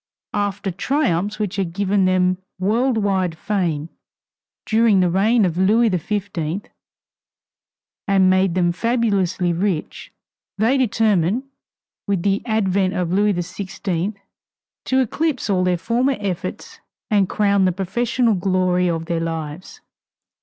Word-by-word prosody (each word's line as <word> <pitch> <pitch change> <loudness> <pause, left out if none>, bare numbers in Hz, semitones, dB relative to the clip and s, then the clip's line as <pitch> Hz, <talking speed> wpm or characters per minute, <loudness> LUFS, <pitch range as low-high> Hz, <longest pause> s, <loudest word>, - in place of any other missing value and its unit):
After 205 -1 -2
triumphs 200 - 0
which 205 -2 -3
had 180 -4 -2
given 200 0 +1
them 185 0 +2 0.2
world 225 +6 +1
wide 190 -5 0
fame 170 -6 -2 0.8
during 220 -2 +3
the 180 -2 +2
reign 210 +4 +3
of 175 -1 -1
Louis 220 +5 +4
XV, 185 -1 -3 1.4
and 195 -2 +4
made 185 -1 +3
them 175 -2 +2
fabulously 195 -4 0
rich, 175 -2 -3 0.5
they 225 +6 +2
determined, 220 -4 +1 0.6
with 195 -4 0
the 200 0 +1
advent 195 -3 +1
of 180 -2 -1
Louis 205 +1 +2
XVI, 185 +1 -3 0.7
to 260 - +2
eclipse 265 -2 -1
all 185 -2 +2
their 180 -1 +1
former 245 +9 0
efforts 195 -4 -5 0.3
and 200 -3 +3
crown 200 -2 +2
the 185 - +3
professional 225 +6 0
glory 180 -1 +1
of 165 -1 -2
their 170 -1 -1
lives. 165 +1 -5
195 Hz, 125 wpm, -21 LUFS, 180-210 Hz, 1.4 s, Louis